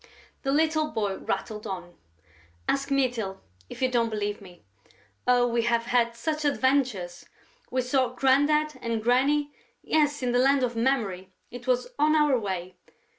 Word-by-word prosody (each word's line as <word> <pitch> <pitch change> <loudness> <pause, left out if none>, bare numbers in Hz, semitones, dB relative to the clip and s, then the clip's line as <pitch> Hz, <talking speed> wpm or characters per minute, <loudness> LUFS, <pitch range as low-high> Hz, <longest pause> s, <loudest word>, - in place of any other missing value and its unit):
The 270 - -1
little 310 +1 +2
boy 205 -6 -2
rattled 210 +2 -4
on: 180 -3 -6 0.7
"Ask 275 0 0
Mytyl, 240 -8 0 0.3
if - - -6
you 255 - +2
don't 235 -2 +2
believe 205 -1 -3
me.... 180 -3 -15 0.6
Oh, 245 -1 +4
we 235 -1 +1
have 235 0 +1
had 235 -1 +1
such 305 +6 -2
adventures!... 260 -11 0 0.4
We 255 0 0
saw 255 +1 +2
Grandad 290 +4 +2
and 230 -2 -2
Granny... 285 +5 +2 0.3
yes, 295 -3 +1
in 245 - +1
the 245 - +2
Land 270 +1 +4
of 240 -1 -1
Memory... 220 -7 -1 0.2
it 245 +1 -9
was 250 -1 +1
on 305 +1 +4
our 300 -3 +4
way. 185 -3 -5
245 Hz, 155 wpm, -26 LUFS, 215-275 Hz, 0.7 s, Oh